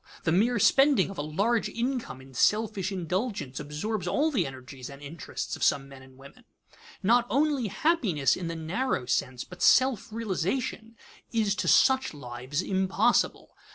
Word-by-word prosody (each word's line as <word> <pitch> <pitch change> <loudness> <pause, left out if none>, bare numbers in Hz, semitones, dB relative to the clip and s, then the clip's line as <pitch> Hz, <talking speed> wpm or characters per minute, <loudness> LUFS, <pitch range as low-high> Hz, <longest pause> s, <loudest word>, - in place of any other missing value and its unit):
The 160 - +1
mere 225 +8 +3
spending 270 -3 +4
of 195 - -8
a - - 0
large 200 +10 0
income 235 - -3
in 135 0 -15
selfish 205 - +1
indulgence 185 - -3
absorbs 150 +9 -4
all 310 +3 +1
the 200 - +1
energies 130 -1 -9
and 140 0 -11
interests 145 +3 -6
of - - -12
some 135 -1 +2
men 135 -1 -13
and 130 0 -17
women. 140 - -15 0.6
Not 240 +4 +4
only 280 -4 +1
happiness 200 - +1
in 175 - -5
the 165 - -4
narrow 165 - -2
sense, 125 0 -1
but 180 0 -13
self 260 -5 +4
realization, 225 +2 -3 0.3
is 220 -4 +1
to - - -2
such 260 - +4
lives 130 +4 -4
impossible. 190 0 +1
190 Hz, 155 wpm, -28 LUFS, 145-235 Hz, 0.6 s, spending